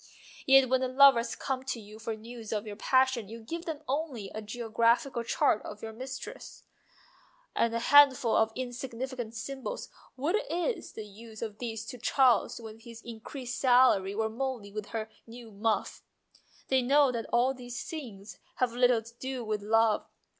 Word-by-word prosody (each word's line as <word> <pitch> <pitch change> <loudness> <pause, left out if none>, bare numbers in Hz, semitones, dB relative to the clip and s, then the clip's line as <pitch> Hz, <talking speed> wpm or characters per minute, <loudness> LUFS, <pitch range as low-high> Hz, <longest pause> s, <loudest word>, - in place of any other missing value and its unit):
Yet 270 -1 +7
when 260 +1 +2
the 260 - +1
lovers 260 -2 +5
come 260 -1 -3
to 260 -3 -3
you 215 0 -12
for 225 0 -4
news 225 0 -9
of 215 -1 -2
your 210 -1 -6
passion 260 -1 +2
you 230 +1 -8
give 330 +10 -6
them 315 -2 -5
only 265 -7 -3
a 220 - -5
geographical 235 +4 +1
chart 220 - +2
of 210 +1 -9
your 220 0 -6
mistress, 260 +3 -8 0.9
and 230 0 +1
a - - +2
handful 265 -2 +6
of 220 0 +3
insignificant 250 -1 -5
symbols. 270 - -5 0.3
What 305 +10 +1
is 355 +3 -2
the 220 - -7
use 220 +2 -10
of 215 -2 -6
these 225 -2 -4
to 250 - -8
Charles 250 -1 +3
with 225 -1 -10
his 230 0 -11
increased 240 +2 -7
salary, 245 -7 +4
or 220 +1 +1
Molly 235 -2 -4
with 210 0 -5
her 220 -1 -4 0.2
new 230 -1 -11
muff? 215 +2 -1 0.7
They 265 -1 +4
know 275 +2 +4
that 230 -2 -4
all 250 +3 +3
these 245 -2 -7
things 220 -10 -8 0.2
have 255 - +1
very 245 +2 -6
little 245 -2 +4
to 230 +1 -13
do 260 -2 -4
with 215 -1 -2
love. 220 +1 +2
235 Hz, 175 wpm, -30 LUFS, 220-260 Hz, 0.9 s, Yet